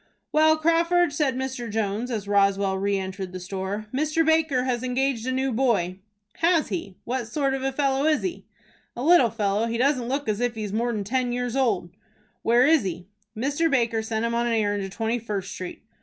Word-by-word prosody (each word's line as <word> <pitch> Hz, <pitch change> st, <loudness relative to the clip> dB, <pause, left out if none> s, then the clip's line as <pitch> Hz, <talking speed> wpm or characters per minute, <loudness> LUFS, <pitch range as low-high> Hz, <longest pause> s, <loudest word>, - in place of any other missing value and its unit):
"Well, 315 Hz, +1 st, +4 dB
Crawford," 335 Hz, +1 st, +2 dB
said 290 Hz, -3 st, +1 dB
Mr. 260 Hz, -2 st, -4 dB
Jones, 215 Hz, +2 st, -2 dB
as 215 Hz, -5 st, -3 dB
Roswell 200 Hz, -1 st, +2 dB
re 200 Hz, 0 st, +1 dB
entered 190 Hz, -1 st, -5 dB
the 185 Hz, -, -5 dB
store, 195 Hz, +3 st, -4 dB
"Mr. 305 Hz, +4 st, +1 dB
Baker 320 Hz, -5 st, +2 dB
has 250 Hz, -2 st, -1 dB
engaged 255 Hz, -1 st, -1 dB
a -, -, +1 dB
new 265 Hz, +1 st, 0 dB
boy." 220 Hz, -7 st, +1 dB, 0.4 s
"Has 335 Hz, -1 st, +2 dB
he? 200 Hz, -, -5 dB
What 245 Hz, -1 st, -3 dB
sort 275 Hz, +3 st, 0 dB
of 270 Hz, -, -2 dB
a 270 Hz, 0 st, 0 dB
fellow 275 Hz, 0 st, +1 dB
is 310 Hz, -1 st, +2 dB
he?" 365 Hz, -2 st, -4 dB, 0.5 s
"A 245 Hz, -, -4 dB
little 320 Hz, -6 st, +6 dB
fellow. 210 Hz, 0 st, 0 dB
He 230 Hz, 0 st, -2 dB
doesn't 255 Hz, -1 st, +1 dB
look 280 Hz, +1 st, -2 dB
as 215 Hz, -1 st, 0 dB
if 245 Hz, -1 st, 0 dB
he 220 Hz, -, -4 dB
was 205 Hz, -1 st, -5 dB
more 235 Hz, +2 st, 0 dB
than 210 Hz, -3 st, -2 dB
ten 250 Hz, +4 st, -1 dB
years 245 Hz, 0 st, -2 dB
old." 210 Hz, -10 st, 0 dB, 0.5 s
"Where 240 Hz, +2 st, +4 dB
is 315 Hz, 0 st, +5 dB
he?" 180 Hz, -2 st, -5 dB, 0.3 s
"Mr. 285 Hz, +7 st, +1 dB
Baker 230 Hz, -5 st, +1 dB
sent 220 Hz, 0 st, -2 dB
him 235 Hz, -, -1 dB
on 235 Hz, 0 st, +1 dB
an 235 Hz, -, 0 dB
errand 205 Hz, -2 st, +1 dB
to 195 Hz, -, -4 dB
Twenty 225 Hz, +4 st, -2 dB
first 200 Hz, -4 st, -4 dB
Street." 180 Hz, -1 st, -7 dB
240 Hz, 210 wpm, -25 LUFS, 205-275 Hz, 0.5 s, little